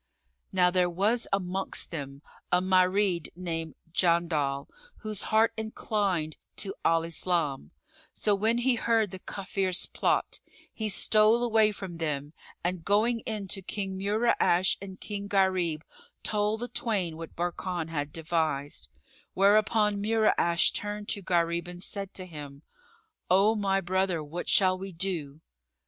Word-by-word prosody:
Now 180 -1 +4
there 180 -1 +2
was 210 +7 +1
amongst 190 0 -1
them 140 -3 -6 0.3
a 180 - +5
Marid 185 -1 +2
named 165 -3 -4 0.2
Jandal 165 -6 +1 0.3
whose 215 -3 -4
heart 220 +1 +4
inclined 205 -7 -2 0.2
to 195 -2 -3
Al 165 0 +3
Islam; 165 -4 0 0.4
so, 210 - +1
when 220 +4 +2
he 250 +2 +2
heard 225 -4 +1
the 190 - -7
Kafirs' 190 -1 -2
plot, - - +1 0.3
he 220 -1 -2
stole 215 +4 +4
away 220 -2 +4
from 190 -4 -7
them 150 -2 -3 0.3
and 175 -1 -2
going 220 +5 +2
in 210 -3 -3
to 195 - -2
King 190 0 -4
Mura'ash 200 -3 +2
and 190 -1 -9
King 200 -1 -5
Gharib, 185 -5 +1 0.4
told 210 +1 0
the 245 - -2
twain 195 -10 -1
what 165 0 -9
Barkan 175 -1 -3
had 145 -2 -3
devised; 155 -3 -2 0.5
whereupon 210 +1 +3
Mura'ash 215 -6 +3
turned 205 0 -4
to 200 - -1
Gharib 170 -1 0
and 175 +1 -7
said 200 -1 -5
to 185 - -4
him, 145 -4 -10 0.7
"O 195 +4 +5
my 195 -3 +1
brother, 185 -2 0
what 160 +4 -5
shall 185 -1 +4
we 195 0 -6
do?" 165 -5 -3
185 Hz, 135 wpm, -28 LUFS, 170-210 Hz, 0.7 s, a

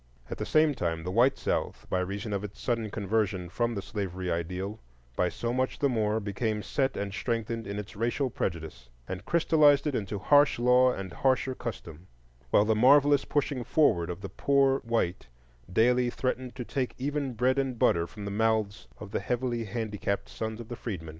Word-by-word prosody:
At - - -5
the - - -3
same 155 -1 +4
time 85 -9 -2
the 90 - -3
white 120 +7 +4
South, - - -2
by 90 - 0
reason 100 +3 -3
of 100 0 -2
its 105 -1 -8
sudden 115 -3 -1
conversion 100 -3 -1
from 120 +5 -1
the 100 - -4
slavery 95 -3 -4
ideal, 90 +5 -3 0.4
by 90 - +1
so 120 +5 -3
much 130 +1 -1
the 140 - +2
more 110 -3 +1
became 105 +1 -2
set 135 -1 -1
and 100 -1 -3
strengthened 115 -1 -2
in 100 +1 -4
its 105 +1 -7
racial 120 +5 -1
prejudice, 80 - -4 0.2
and 95 +2 -6
crystallized 155 -4 +4
it 150 - 0
into 105 -3 -2
harsh 145 +8 +4
law 125 +1 +5
and 95 -6 -6
harsher 130 0 +1
custom; 95 -9 -7 0.4
while 105 - +4
the 110 - +3
marvellous 140 +5 +5
pushing 140 -3 -1
forward 90 - +2
of 90 +1 -5
the - - -6
poor 135 -1 +2
white 115 - -1 0.4
daily 125 +5 +3
threatened 130 0 -3
to 125 -2 -5
take 130 0 -2
even 140 0 -2
bread 130 +4 +2
and 130 -3 -1
butter 85 -5 +2
from 105 +1 -9
the 100 - -4
mouths 110 -1 0
of 105 -2 -9
the - - -1
heavily 120 -2 -2
handicapped 105 -2 -3
sons 110 0 -5
of 115 - -8
the 120 - -6
freedmen. 95 -9 -6
110 Hz, 190 wpm, -28 LUFS, 100-130 Hz, 0.4 s, law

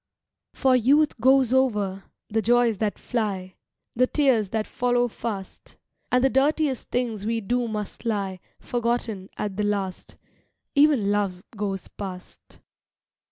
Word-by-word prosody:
For 265 -2 +3
youth 280 +4 +3
goes 260 0 +4
over, 210 -7 +1 0.2
the 220 +1 0
joys 235 -1 +3
that 215 -2 -1
fly, 195 -6 -3 0.4
The 255 +2 +3
tears 255 -10 +2
that 220 +1 -1
follow 245 0 +1
fast; 210 -4 -7 0.3
And 250 0 +3
the 270 - +5
dirtiest 280 0 +1
things 235 -5 -1
we 225 +2 0
do 240 +3 -1
must 210 -1 -5
lie 200 -5 -2 0.2
Forgotten 235 -5 -2
at 200 -2 -3
the 210 - 0
last; 200 -3 -2 0.6
Even 280 -9 +4
Love 195 -3 -1
goes 200 -2 -3
past. 185 -3 -9
225 Hz, 130 wpm, -25 LUFS, 200-250 Hz, 0.6 s, the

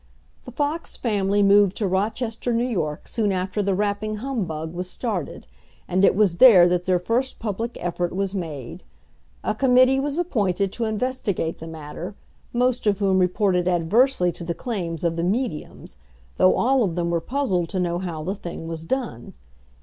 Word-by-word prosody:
The 250 - -8
Fox 290 +6 -3
family 205 -3 +1
moved 200 -1 +5
to 210 - -1
Rochester, 220 +5 -1
New 235 +1 +1
York, 155 -11 -3
soon 215 -3 0
after 185 +2 -1
the 200 -1 0
rapping 210 +2 -1
humbug 185 - -4
was 180 +1 -4
started; 200 - -4 0.4
and 185 +2 +1
it - - +5
was 195 -4 +2
there 190 -7 +8
that 180 0 0
their 185 -1 +3
first 235 +9 -1
public 225 +2 -4
effort 175 0 -2
was 195 0 -1
made. 160 -4 -6 0.6
A - - 0
committee 255 0 +4
was 285 +2 -2
appointed 200 - 0
to 235 - -2
investigate 220 -7 -2
the 165 - -8
matter, 160 +4 -7 0.4
most 250 -1 +1
of 200 -2 +3
whom 195 -2 +2
reported 180 -1 +1
adversely 180 +4 +2
to 170 - -8
the 170 0 -3
claims 175 - -4
of 170 -1 0
the 170 - -1
"mediums;" 195 -3 -3 0.4
though 185 - +5
all 260 0 +3
of 180 -6 -1
them 170 -1 -1
were 170 -1 0
puzzled 195 - -1
to 190 - -2
know 175 -1 0
how 170 -4 -5
the 185 +4 -2
thing 170 -4 -7
was 165 -1 -6
done. 230 - -4
195 Hz, 175 wpm, -23 LUFS, 175-230 Hz, 0.6 s, there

